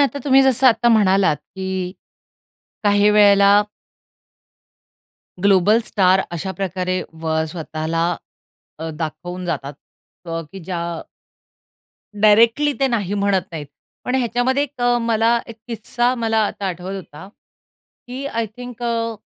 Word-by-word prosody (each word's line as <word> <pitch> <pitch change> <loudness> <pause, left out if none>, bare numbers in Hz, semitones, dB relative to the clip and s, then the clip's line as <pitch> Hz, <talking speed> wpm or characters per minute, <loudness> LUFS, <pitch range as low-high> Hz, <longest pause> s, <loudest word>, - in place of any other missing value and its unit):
आता 285 0 +1
तुम्ही 270 -1 +5
जसं 265 0 +3
आता 240 -1 +4
म्हणालात 195 -7 +3
की 190 +3 -5 0.9
काही 205 0 +4
वेळेला 200 -1 +6 1.8
ग्लोबल 200 +3 +4
स्टार 190 -2 +3
अशा 190 +3 -4
प्रकारे 185 -1 -2 0.3
व 160 -1 -1
स्वतःला 160 0 -3 0.7
अ, 160 +1 -5
दाखवून 175 +3 -5
जातात 145 -5 -3 0.5
क 165 0 -3
की 195 - -8
ज्या 180 - -2 1.4
डायरेक्टली 230 +7 +5
ते 270 - +4
नाही 205 -5 -1
म्हणत 200 -2 +1
नाहीत. 155 -3 -6 0.4
पण 250 - -2
ह्याच्यामध्ये 255 +2 +1
एक 285 -3 -7
अ, 245 0 +3
मला 230 0 +2
एक 230 -2 -10
किस्सा 240 +2 -1
मला 225 -2 0
आता 200 - -5
आठवत 185 +1 -5
होता, 190 -1 -11 0.8
की 260 +3 -6
आय 230 -4 -2
थिंक 245 -1 -9
अ 230 -1 -1
205 Hz, 125 wpm, -20 LUFS, 185-235 Hz, 1.8 s, वेळेला